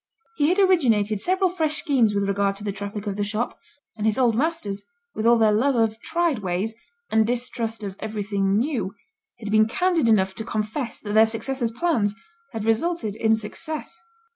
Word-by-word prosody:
He 295 0 +3
had 365 - +2
originated 235 - +3
several 370 - +2
fresh 315 -4 0
schemes 245 -9 +2
with 200 - +1
regard 200 0 0
to 200 - -9
the 205 - -2
traffic 200 +1 -6
of 200 -1 -3
the 205 - 0
shop; 215 +4 -3 0.4
and 215 -1 -1
his 215 - +1
old 245 -4 +3
masters, 250 -8 -1 0.3
with 220 - -1
all 235 0 +6
their 220 -1 +4
love 255 +6 +2
of 225 -1 +1
tried 335 -7 0
ways, 190 +3 -2 0.4
and 220 -1 +3
distrust 235 -2 -2
of 195 -2 -5
everything 200 -2 -1
new, 235 -6 -1 0.4
had 210 -3 -6
been 215 0 +5
candid 330 0 +1
enough 190 -3 +3
to 220 - -4
confess 220 +4 -3
that 205 -1 -5
their 220 +1 +6
successors' 235 +2 -2
plans 230 -6 0 0.4
had 225 -3 -4
resulted 225 - 0
in 220 0 +3
success. 310 +10 -6
220 Hz, 185 wpm, -24 LUFS, 205-270 Hz, 0.4 s, all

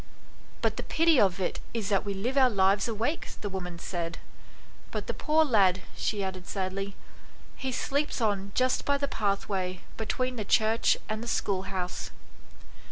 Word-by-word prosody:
"But - - +1
the - - -1
pity 325 -3 +4
of 190 -2 +3
it 185 - -1 0.2
is 220 -4 -1
that 200 -2 +2
we 200 -1 -3
live 235 +8 -2
our 265 -2 +6
lives 200 0 +3
awake," 230 +8 -1
the 205 - -2
woman 180 -3 -5
said. 170 -1 -4 0.7
"But - - -4
the - - -2
poor 315 +1 +3
lad," 195 -8 +4
she 205 -2 -1
added 185 -1 -4
sadly, 195 0 -3 0.6
"he 265 -1 -3
sleeps 280 +3 0
on 200 -3 0
just 255 0 +2
by 285 0 +2
the 280 0 0
pathway 195 -5 -1 0.2
between 255 +3 -1
the 215 - -1
church 220 +2 +3
and 215 0 -2
the 235 - -6
schoolhouse." 190 -4 -2
205 Hz, 165 wpm, -29 LUFS, 190-250 Hz, 0.7 s, our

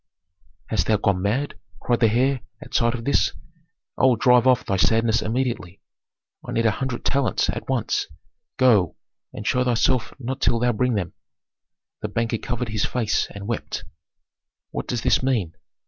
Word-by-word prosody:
"Hast - - 0
thou 110 - +3
gone 100 -3 +1
mad?" 120 +9 -1 0.2
cried 120 -1 0
the 115 - +4
heir, 130 +3 +1 0.2
at - - -13
sight 120 +1 +2
of 115 -1 -7
this. 140 - +2 0.7
"I - - +4
will 130 -2 +5
drive 125 +1 +4
off 125 -1 +4
thy 95 - 0
sadness 115 +3 +3
immediately. 115 -6 -2 0.6
I - - -6
need 115 - +1
a 110 - +5
hundred 130 +2 -4
talents 135 -6 +1
at - - -7
once. - - 0 0.5
Go, 105 -10 +4 0.4
and - - -8
show 125 - +2
thyself 125 0 +1
not 130 +1 -5
till 120 - +3
thou 120 +1 +2
bring 125 +1 0
them." 90 -5 -2 0.9
The - - -2
banker 115 -1 -1
covered 120 -1 -3
his 105 -1 -1
face 115 -4 0
and 100 0 -8
wept. 115 0 -4 0.9
"What - - -4
does 120 -3 -2
this - - +3
mean?" 115 -11 0
115 Hz, 170 wpm, -23 LUFS, 110-125 Hz, 0.9 s, will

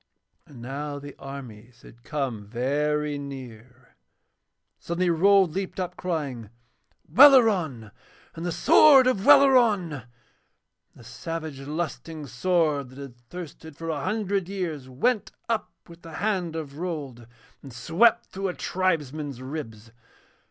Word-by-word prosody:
And 125 -5 -12
now 145 +3 -5
the 145 0 -10
armies 125 -4 -10
had 120 - -16
come 130 -6 -3
very 145 +5 -1
near. 130 -3 -11 0.8
Suddenly 175 +1 -1
Rold 190 +1 +4
leaped 195 +1 -4
up, 180 -1 -3
crying: 140 - -4 0.6
'Welleran! 205 - +5 0.4
And 165 - -8
the 175 - -2
sword 275 - +6
of 250 -7 +1
Welleran!' 235 - +5
And 135 -5 -7 0.9
the - - -15
savage, 160 -4 -6
lusting 155 +1 -5
sword 145 0 0
that 130 - -15
had 140 -3 -9
thirsted 160 +4 -11
for 165 0 -6
a 150 -3 -3
hundred 200 -4 -1
years 165 -9 -4
went 195 - -1
up 230 -2 -2 0.2
with 170 -1 -15
the 165 -1 -11
hand 185 -3 -2
of 150 -2 -6
Rold 145 -10 -5 0.3
and 135 - -11
swept 165 - +2
through 195 +1 -4
a 180 - -4
tribesman's 150 -7 -2
ribs. 115 -5 -8
155 Hz, 130 wpm, -25 LUFS, 135-185 Hz, 0.9 s, sword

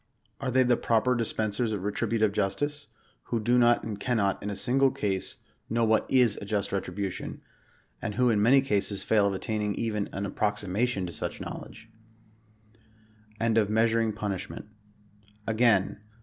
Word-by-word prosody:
Are 135 - -2
they 130 +1 +4
the 120 -1 +3
proper 115 +2 +2
dispensers 110 -1 -1
of 100 -3 -3
retributive 110 +1 0
justice, 145 +10 -2 0.4
who 120 - -1
do 120 +3 +2
not 120 0 +4
and 105 -2 -5
cannot, 105 -4 0
in 105 - -4
a 100 - -3
single 130 +6 +3
case, 100 -6 -3 0.3
know 115 +1 +1
what 110 0 +2
is 125 -5 +3
a - - -6
just 100 -1 -1
retribution; 95 0 -4 0.6
and 105 - -4
who 125 -1 +3
in 105 -2 +2
many 130 +5 +6
cases 100 -5 0
fail 105 -2 +3
of 100 - -1
attaining 105 +1 -2
even 105 -3 -2
an 100 +1 -3
approximation 105 +1 -1
to 85 - -6
such - - -4
knowledge? 115 - -8 1.5
AND 115 -1 +3
OF 105 -2 +1
MEASURING 115 0 +2
PUNISHMENT. 105 -3 -5 0.8
Again. 110 -3 +2
110 Hz, 155 wpm, -28 LUFS, 100-120 Hz, 1.5 s, many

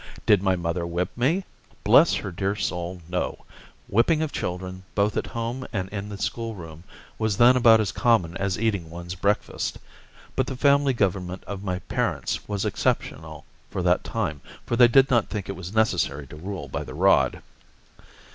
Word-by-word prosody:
Did 105 -3 +5
my 95 -1 +2
mother 85 0 -2
whip 85 +1 -2
me? 160 +11 +1 0.4
Bless - - +6
her 100 - -4
dear 95 +3 -1
soul, 90 -3 -3
no! 90 +1 -3 0.4
Whipping 155 - +3
of 155 - -3
children, 90 +1 -4
both 105 +1 +2
at - - -1
home 115 +3 -4
and 95 -3 -3
in 100 0 -5
the 100 - -6
school 115 +2 -3
room, 80 -2 -10 0.4
was 110 -3 0
then 120 +2 +7
about 115 -3 +6
as 105 -4 0
common 95 -9 +2
as 100 -1 -1
eating 100 -7 -1
one's 85 +1 -7
breakfast; 100 +3 -1 0.6
but - - +1
the 130 - -5
family 140 0 +4
government 95 -4 -1
of 100 -1 -6
my 90 -2 -2
parents - - -2
was 100 -2 -2
exceptional - - -2 0.2
for - - -3
that - - +2
time, 75 -2 -3 0.2
for 120 - -1
they 120 0 +7
did 135 +2 +5
not 120 -4 +3
think 105 -3 -4
it 100 - -4
was 95 0 -7
necessary 100 -10 +1
to 70 - -12
rule 95 +5 -6
by - - -4
the - - -9
rod. - - +3
100 Hz, 180 wpm, -25 LUFS, 90-115 Hz, 0.6 s, then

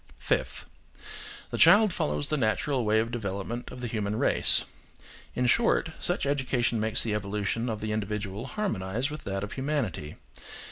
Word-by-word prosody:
Fifth. - - -2 0.8
The - - -3
child 210 -3 +7
follows 75 0 -1
the - - +1
natural 130 +1 0
way 110 0 +2
of 115 +1 +1
development 110 +1 -4
of 125 - -9
the 125 - -2
human 105 -2 -2
race. - - +2 0.7
In 125 - +1
short, 165 - +3
such 175 - +1
education 130 -4 0
makes 110 +1 +2
the 110 - -1
evolution 105 +3 -2
of 110 -2 -3
the 110 0 -2
individual 105 +1 -3
harmonise 125 - -2
with 150 - -8
that 95 0 -2
of 105 - -5
humanity. 130 - -2
110 Hz, 155 wpm, -28 LUFS, 105-130 Hz, 0.8 s, child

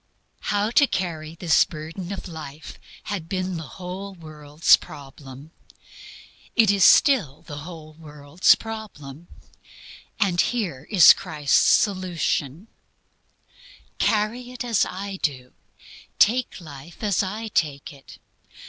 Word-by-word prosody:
How 205 +2 0
to 285 +3 +4
carry 165 -6 -4
this 165 -1 +3
burden 165 +4 -8
of 200 - -6
life 155 -3 -10 0.2
had 185 -5 -5
been 185 -2 -3
the 160 -3 -7
whole 190 +2 -7
world's 155 -2 +2
problem. 140 0 -12 1.0
It 225 -5 +5
is 200 -2 +2
still 195 - +4
the 145 -1 -8
whole 155 -1 -10
world's 150 +1 +1
problem. 175 -9 -9 0.9
And 180 -3 +2
here 180 - -3
is 185 -8 +8
Christ's 150 -2 0
solution: 180 - 0 1.3
"Carry 225 +4 0
it 250 - -6
as 230 -4 +1
I 195 +1 -6
do. 130 -4 -3 0.6
Take 245 +2 +2
life 155 +1 -12
as 205 -4 +1
I 215 +3 -5
take 150 -4 -2
it. 140 -1 -15
170 Hz, 115 wpm, -23 LUFS, 150-200 Hz, 1.3 s, is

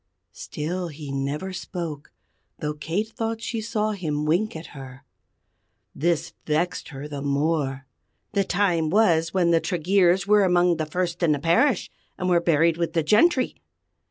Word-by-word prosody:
Still 175 +4 -4
he 150 -3 -8
never 140 +7 -3
spoke, 165 -5 -6 0.5
though 150 0 -3
Kate 165 +9 -3
thought 225 0 -3
that 225 - -14
she 225 -1 -3
saw 215 -1 -1
him 155 -7 -2
wink 175 +7 +1
at 160 +1 -9
her. 135 -1 -10 0.9
This 165 +2 -1
vexed 170 +4 -1
her 140 -1 -7
the 145 -2 -6
more. 140 -1 -1 0.5
"The 200 - +1
time 175 -5 +1
was 170 -4 +3
when 175 -2 +2
the 165 -1 +3
Tregeers 180 +1 +2
were 210 0 +5
among 180 -2 +3
the 155 - -2
first 175 +2 -2
in 165 -3 +3
the 145 - -2
parish, 175 - +2 0.3
and 185 - -1
were 175 -1 +4
buried 165 0 +3
with 170 -1 -2
the 165 - +1
gentry! 255 - +3
170 Hz, 160 wpm, -24 LUFS, 150-190 Hz, 0.9 s, were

